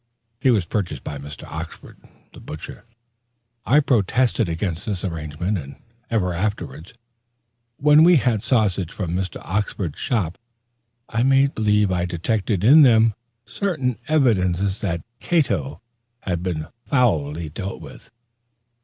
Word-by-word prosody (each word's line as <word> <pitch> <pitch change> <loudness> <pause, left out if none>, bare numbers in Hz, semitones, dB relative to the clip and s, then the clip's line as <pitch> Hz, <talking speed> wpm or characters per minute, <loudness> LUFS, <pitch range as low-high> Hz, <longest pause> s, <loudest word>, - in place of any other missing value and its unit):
He 130 - +2
was 105 -8 +3
purchased 85 -7 -3
by 70 - -6
Mr. 70 +1 -9
Oxford, - - -8 0.3
the - - -12
butcher. 80 +2 -9 0.8
I 145 - +6
protested 120 - +1
against 85 0 -3
the 100 -2 -2
arrangement 85 +4 -3
and 70 -2 -9 0.3
ever 95 -6 0
afterwards, 90 - -4 0.8
when 150 +2 +6
we 175 +1 +7
had 120 -7 +2
sausages 100 -9 0
from 90 -5 -3
Mr. 90 -1 -3
Oxford's 95 -4 -2
shop, 100 - -1 0.7
I 110 - -1
made 135 +2 +4
believe 105 -2 +2
I 90 -1 0
detected 95 +3 -1
in 145 +8 +8
them 115 -4 +5 0.3
certain 155 - -2
evidences 100 - +2
that 85 -6 -2
Cato 100 - 0 0.4
had 90 -3 -2
been 85 -4 -3 0.2
foully 85 - +1
dealt 95 +6 -6
with. - - -13
100 Hz, 125 wpm, -22 LUFS, 85-120 Hz, 0.8 s, in